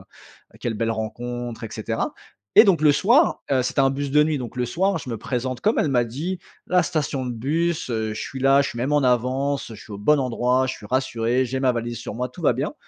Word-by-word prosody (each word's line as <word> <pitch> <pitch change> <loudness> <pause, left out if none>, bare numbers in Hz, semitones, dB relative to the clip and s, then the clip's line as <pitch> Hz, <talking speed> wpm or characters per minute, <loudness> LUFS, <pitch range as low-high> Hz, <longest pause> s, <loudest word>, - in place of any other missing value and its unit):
heu, - - -21
quelle 115 -2 -2
belle 115 +1 -1
rencontre 120 +2 -4
et 115 - -4
cetera» - - -3 0.4
et - - +10
donc, 180 -6 +3
le 155 - +6
soir, 240 - +3
heu, 130 -2 +3
c'était 130 - -3
un 135 - +4
bus 140 0 -3
de 150 +1 +5
nuit. 155 -1 0
Donc, 125 -2 -6
le 125 - 0
soir, 190 +8 0
je 135 - -9
me 115 - -2
présente 125 +2 -3
comme 215 - +2
elle - - +2
m'a 125 -3 +3
dit, 160 +11 -4 0.3
la 180 0 +3
station 145 -5 -2
de 125 - -3
bus, 155 +8 -1
heu, 110 -2 -2
je - - -5
suis 135 - -6
là, 135 +1 +5
je - - -3
suis - - -9
même 135 +5 -1
en 145 - +3
avance, 130 +3 +1
je - - -12
suis 105 - -12
au 100 - -6
bon 150 +9 +3
endroit, 125 0 +1
je 130 - -2
suis 105 - -11
rassuré. 125 0 0
J'ai 130 +1 -3
ma 130 - +3
valise 120 -1 -3
sur 115 - -6
moi, 125 +1 -2
tout 125 - -12
va - - +4
bien - - -2
130 Hz, 255 wpm, -23 LUFS, 120-145 Hz, 0.4 s, et